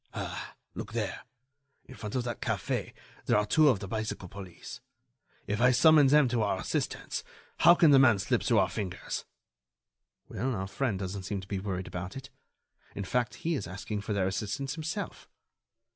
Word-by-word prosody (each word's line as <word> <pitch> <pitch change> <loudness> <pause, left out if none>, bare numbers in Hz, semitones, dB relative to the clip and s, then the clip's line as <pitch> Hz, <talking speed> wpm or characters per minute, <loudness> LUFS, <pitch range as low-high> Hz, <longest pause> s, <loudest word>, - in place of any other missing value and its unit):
"Ah! - - -5 0.2
Look - - -7
there! - - -2 0.6
In - - -12
front 105 -2 -6
of 125 - +1
that 120 -2 -4
café - - -2 0.4
there - - +4
are 105 - +2
two 155 +7 +5
of 120 -8 +2
the 100 - -5
bicycle 110 -2 -3
police. 95 -2 -9 0.6
If 105 +2 -2
I 125 - +7
summon 150 +3 +6
them 150 0 +5
to 120 -1 +1
our 105 - 0
assistance, - - -2 0.4
how 175 +1 +8
can 165 -4 +6
the 135 - +8
man 120 -6 +6
slip 95 - 0
through - - +2
our - - +4
fingers?" 95 -4 -4 1.0
"Well, 130 0 -2
our 95 -1 -2
friend 105 +2 -1
doesn't 95 +1 -4
seem 100 +1 -2
to 95 - -12
be 100 -1 -2
worried 95 -2 -3
about 90 +6 -6
it. 135 +1 -9 0.6
In 100 - -3
fact, 120 +5 -1
he 170 - +2
is 105 - -2
asking 100 +3 -4
for 105 +1 -3
their 100 -2 +1
assistance 120 +8 -2
himself." 155 0 -5
110 Hz, 185 wpm, -30 LUFS, 95-135 Hz, 1.0 s, how